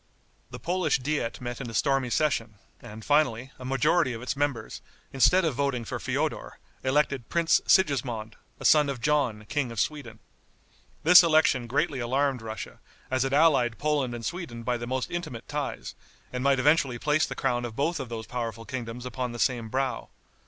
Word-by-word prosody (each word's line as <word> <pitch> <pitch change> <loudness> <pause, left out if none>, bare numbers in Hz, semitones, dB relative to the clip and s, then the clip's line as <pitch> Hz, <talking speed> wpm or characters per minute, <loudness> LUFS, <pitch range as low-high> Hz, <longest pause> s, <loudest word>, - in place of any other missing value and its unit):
The - - -8
Polish 175 -4 0
diet 140 -3 -2
met 120 +1 -5
in 125 - -5
a 115 - -7
stormy 135 0 +1
session, 120 -6 0 0.3
and 110 -2 -10
finally, 135 -4 +1
a - - -9
majority 135 +2 +2
of 115 - -7
its 125 - -2
members, 145 -3 -2 0.3
instead 180 +7 +4
of 160 - +1
voting 130 -3 -1
for - - -4
Feodor, - - -3 0.3
elected 135 -2 0
Prince 170 -1 +3
Sigismond, 120 - +2 0.2
a - - -7
son 150 -2 +5
of 135 -3 -4
John, 125 -7 0
King 135 +1 -2
of 115 - -5
Sweden. 130 -5 -3 0.9
This 180 +3 +9
election 155 -7 +3
greatly 140 +2 0
alarmed 130 +1 0
Russia, 110 0 -7 0.3
as 130 0 +2
it 135 - -2
allied 140 -6 +3
Poland 145 -5 0
and 115 -1 -7
Sweden 165 -10 -5
by 125 +1 0
the 120 0 -5
most 130 0 -2
intimate 155 -10 -5
ties, 145 -1 -4 0.4
and 125 0 -3
might 140 -1 +3
eventually 140 -2 +3
place 150 +4 +1
the - - -6
crown 125 -3 0
of 120 -2 -5
both 155 +5 0
of 130 -3 -5
those 115 -1 -5
powerful 115 -2 -5
kingdoms 125 -2 -6
upon 125 -1 -4
the - - -6
same 120 -2 0
brow. 130 +1 -2
130 Hz, 180 wpm, -27 LUFS, 120-150 Hz, 0.9 s, This